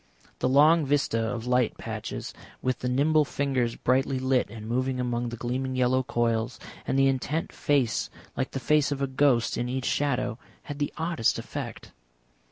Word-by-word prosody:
The 125 - +1
long 155 +5 +6
vista 140 -5 +1
of 115 0 -3
light 125 -2 +1
patches, - - -5 0.3
with 130 -2 -1
the 125 - -2
nimble 150 +4 +3
fingers 135 -4 -1
brightly 130 +1 +1
lit 130 -2 +1
and 110 0 -8
moving 130 +2 -1
among 120 -1 -1
the 120 - -6
gleaming 130 +3 -2
yellow 130 +1 +3
coils, 115 -3 -1 0.3
and 135 - +1
the 135 - +5
intent 135 +4 -1
face 140 -6 +1 0.3
like 130 - -1
the 135 - -4
face 150 +1 +2
of 140 -1 -1
a - - +4
ghost, 130 -4 +2
in 120 +1 -1
each 130 +1 -2
shadow, 125 -4 0 0.2
had 145 -1 -7
the 145 - -1
oddest 160 -7 +1
effect. - - -6
130 Hz, 175 wpm, -27 LUFS, 120-140 Hz, 0.3 s, long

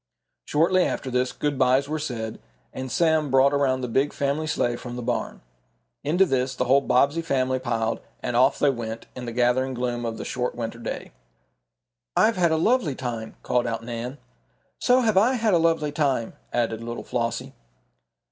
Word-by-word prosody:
Shortly 175 +5 +3
after 130 - -2
this, 125 0 +1
good 145 -2 -2
bys 130 +2 +3
were 155 +1 -2
said, 115 -7 -4 0.3
and 130 -1 -5
Sam 160 -3 +2
brought 135 +2 +4
around 135 -2 +1
the 125 - -2
big 135 +5 +1
family 140 +2 -1
sleigh 120 -6 0
from 120 0 -7
the 125 - -5
barn. - - -2 0.6
Into 170 +7 +3
this 130 -4 0
the 125 - 0
whole 135 +3 +5
Bobbsey 140 +5 +2
family 130 -4 0
piled, 115 -3 -1 0.2
and 120 - -2
off 130 +3 +4
they 145 - +3
went, 115 -2 -5
in 125 - -6
the 120 - -4
gathering 125 +2 +1
gloom 120 -1 -2
of 115 -1 -3
the - - -6
short 125 -1 -2
winter 115 -1 -5
day. 115 - -5 1.1
"I've 225 - +4
had 170 -2 +3
a 160 - +2
lovely 180 - +2
time!" 115 -4 -5
called 125 0 +1
out 115 0 -3
Nan. 120 +3 -5 0.6
"So 250 +1 +4
have 220 -5 +2
I 230 +7 +5
had 220 -4 +1
a 170 - +5
lovely 165 -2 +2
time," 140 -6 0 0.2
added 115 -2 -1
little 120 0 -5
Flossie. 115 -2 -3
130 Hz, 185 wpm, -25 LUFS, 120-150 Hz, 1.1 s, whole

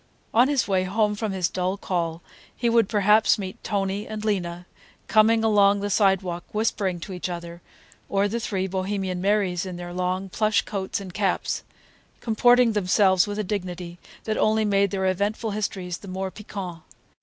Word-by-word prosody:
On 240 +3 +5
his 280 -3 +1
way 190 -2 +1
home 210 +2 +1
from 210 0 -3
his 185 -3 0
dull 185 +2 -2
call, 170 -4 -2 0.3
he 240 - 0
would 230 -3 +3
perhaps 210 +1 +4
meet 190 -2 -7
Tony 200 -1 -2
and 215 0 -5
Lena, 180 -4 -2 0.4
coming 220 +1 +4
along 205 -2 +4
the 205 0 -2
sidewalk 190 -3 +2
whispering 200 -4 0
to 190 - -6
each 180 0 -4
other, 170 0 -7 0.5
or 200 +1 +2
the 230 +3 -2
three 195 -4 -2
Bohemian 190 -1 -2
Marys 195 -3 +1
in 185 -2 -6
their 175 0 -7
long 185 +1 -1
plush 215 +2 +1
coats 195 -2 -3
and 190 -3 -9
caps, 195 -2 -1 0.6
comporting 245 +1 +4
themselves 190 -1 +3
with 205 0 -4
a 215 - -1
dignity 180 -3 -5 0.2
that 215 - -2
only 215 0 +3
made 200 -1 +2
their 190 -1 -2
eventful 205 +4 0
histories 190 -4 -3
the 200 - -12
more 190 0 -4
piquant. 190 -5 -7
195 Hz, 170 wpm, -24 LUFS, 185-210 Hz, 0.6 s, On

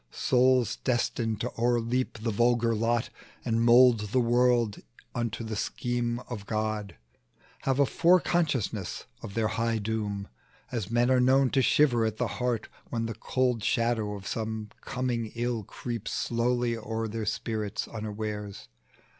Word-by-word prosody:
Souls 125 - +2
destined 120 -3 -1
to 125 - -2
o'erleap 120 +1 +1
the 115 +1 -2
vulgar 120 +1 +2
lot, 115 +2 0 0.3
And 115 -1 +1
mould 120 0 +7
the 130 - +2
world 120 -2 +2 0.3
unto 120 -2 -2
the 110 -1 -4
scheme 120 +2 -1
of 115 -5 -8
God, 110 -4 -2 0.7
Have 135 -1 +2
a 140 - +6
fore 175 +6 +4
consciousness 140 - -1 0.2
of 100 - -8
their 110 -2 +1
high 115 +1 0
doom, 105 -2 -3 0.4
As 115 -6 -3
men 120 +2 +2
are 130 - +5
known 130 +1 +4
to 135 - +3
shiver 125 -3 +4
at 110 -1 -1
the 125 - 0 0.2
heart, 120 -3 0 0.2
When 115 -1 -2
the 115 - -3
cold 125 -1 0
shadow 115 -3 +1
of 100 -1 -9
some 110 -1 -3
coming 125 -4 -2
ill 120 -1 -1
Creeps 115 +2 -5
slowly 120 0 0
o'er 115 0 -3
their 110 0 -4
spirits 110 -1 -2
unawares. 105 - -5
115 Hz, 145 wpm, -28 LUFS, 110-125 Hz, 0.7 s, mould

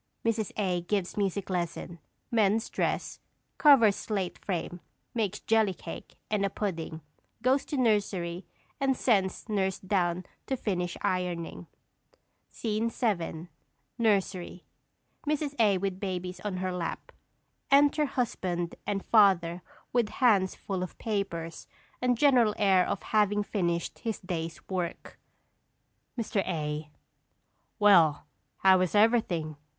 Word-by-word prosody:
[_Mrs. 225 -2 0
A. 185 -4 0
gives 190 +1 -2
music 200 -1 -1
lesson; 170 -1 -3 0.3
mends 220 -1 +2
dress; - - -1 0.4
covers 245 -9 +7
slate 195 -4 -3
frame; 175 -1 -3 0.3
makes 210 -3 -1
jelly 220 -4 +2
cake - - -9 0.2
and 210 -2 +1
a 200 - +2
pudding; 165 -6 -4 0.4
goes 265 +3 +3
to 290 - -3
nursery 200 -7 0 0.3
and 270 -2 +1
sends 195 -6 +1
nurse 190 -3 0
down 185 -2 0 0.2
to 265 - -1
finish 180 -6 -2
ironing._] 175 -2 -2 0.8
SCENE 220 0 -1
VII. 175 -8 -2 0.5
NURSERY. 195 -5 0 0.6
[_Mrs. 295 -1 0
A. 205 -4 +4
with 190 0 -3
babies 185 -2 -4
on 205 -3 -4
her 185 0 -2
lap. 175 -2 -4 0.6
Enter 290 +2 +5
husband 180 -10 -2
and 195 -1 -2
father 185 -5 +4 0.3
with 240 -3 +2
hands 205 -8 +3
full 190 -2 -4
of 185 - -5
papers 195 -7 -3 0.3
and 250 -1 +2
general 245 -6 +4
air 195 -3 +4
of 185 - -3
having 210 -1 +2
finished 170 -5 -2
his 225 -3 -3
day's 165 -3 -5
work._] 180 -3 -4 1.0
Mr. 220 -2 0
A. 150 -3 -3 0.9
Well, 170 -8 +5 0.4
how 190 -1 +6
is 185 +2 0
everything? 200 -9 +2
195 Hz, 120 wpm, -29 LUFS, 175-220 Hz, 1.0 s, covers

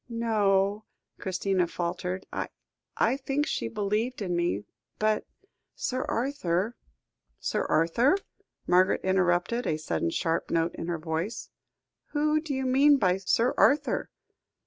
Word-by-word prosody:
"No 230 -1 -2 0.2
o," 200 +2 +1 0.3
Christina 185 -1 0
faltered. 180 +2 -3 0.7
"I 265 - +2
think 275 +2 -1
she 115 - -2
believed 210 - -1
in 180 -2 -1
me, 170 - 0 0.3
but 215 0 +1 0.5
Sir 255 0 -2
Arthur 230 -5 -1 0.3
" - - -49
"Sir - - 0
Arthur," 200 - +3 0.5
Margaret 185 +2 +3
interrupted, 190 +5 +1
a 155 - +1
sudden 85 - -1
sharp 165 - -1
note 165 0 +1
in 165 - -6
her 175 -1 -1
voice; 165 +8 -4 0.6
"who 305 +1 +2
do 310 -2 -6
you 265 -1 -1
mean 280 +3 +5
by 185 -6 +2
Sir 230 +6 +2
Arthur?" 290 +2 +3
195 Hz, 130 wpm, -28 LUFS, 175-255 Hz, 0.7 s, mean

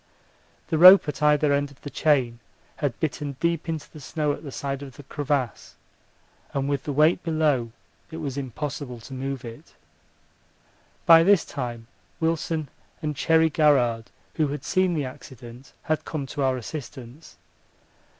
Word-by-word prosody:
The 160 - 0
rope 185 0 +9
at 150 - -4
either 150 -1 +3
end 145 0 0
of 140 - -19
the 145 - -8
chain 130 -6 +1 0.4
had 140 -5 -2
bitten 145 -1 -3
deep 170 -1 -1
into 160 -3 -4
the 155 - -11
snow 150 +2 -2
at - - -8
the 145 - -8
side 140 +1 -4
of 135 -2 -10
the 145 - -11
crevasse, 140 -3 -3 0.8
and 135 0 0
with 140 -1 -2
the 145 - -2
weight 155 +5 +3
below, 150 -8 0 0.4
it 160 - -8
was 140 -5 -4
impossible 140 -1 -5
to 135 - -11
move 135 0 -4
it. 115 -1 -11 1.3
By 165 -1 +8
this 195 0 +4
time 120 -4 -5 0.3
Wilson 160 -2 -1 0.3
and 150 -1 -2
Cherry 160 +2 +3
Garrard, 125 -7 +3 0.3
who 155 -2 +1
had 140 0 -5
seen 185 -2 +1
the 150 -3 -1
accident, 125 0 -11
had 155 -2 -1
come 150 -4 -4
to 140 - -5
our 130 -1 +1
assistance. 130 +1 -9
145 Hz, 160 wpm, -25 LUFS, 130-155 Hz, 1.3 s, rope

